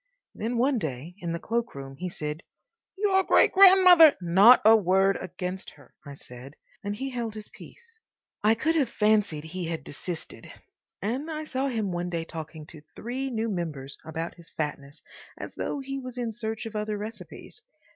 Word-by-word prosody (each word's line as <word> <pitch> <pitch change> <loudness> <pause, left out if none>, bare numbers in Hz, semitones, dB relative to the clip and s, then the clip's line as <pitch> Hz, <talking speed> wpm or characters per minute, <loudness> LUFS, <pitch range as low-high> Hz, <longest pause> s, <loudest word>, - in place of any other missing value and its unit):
Then 235 +3 -3
one 255 +1 +2
day 150 0 -5
in 170 -3 -4
the 170 - -2
cloakroom 150 -14 -4
he 180 +4 -4
said, 150 -1 -5 0.6
"Your 385 -1 +3
great - - +4
grandmother—" 370 -5 +8
"Not 190 +8 +7
a 220 +1 +9
word 195 -1 +3
against 185 +1 -6
her," 145 -4 -20
I 145 -2 -9
said; 130 +2 -11 0.3
and 205 0 -3
he 270 +4 -4
held 235 -3 -4
his 215 -1 -9
peace. 460 -1 -15 0.4
I 215 +2 +4
could 310 +8 0
have 300 -6 +1
fancied 210 -8 +1
he 170 +2 -5
had 160 -2 -4
desisted, 165 +4 -7 0.5
and 255 +9 -2
I 310 -1 -4
saw 275 -2 -2
him 220 -7 -2
one 175 0 -3
day 165 -2 -3
talking 160 -1 -8
to 155 -1 -13
three 260 +4 -4
new 225 -2 -2
members 150 -7 -5
about 160 +1 -5
his 170 -2 -16
fatness 145 -1 -5 0.3
as - - -8
though 290 - -3
he 275 0 -5
was 255 -1 -8
in 240 -2 -2
search 220 0 -5
of 225 -1 -7
other 210 0 -2
recipes. 220 - -9
210 Hz, 175 wpm, -27 LUFS, 165-250 Hz, 0.6 s, a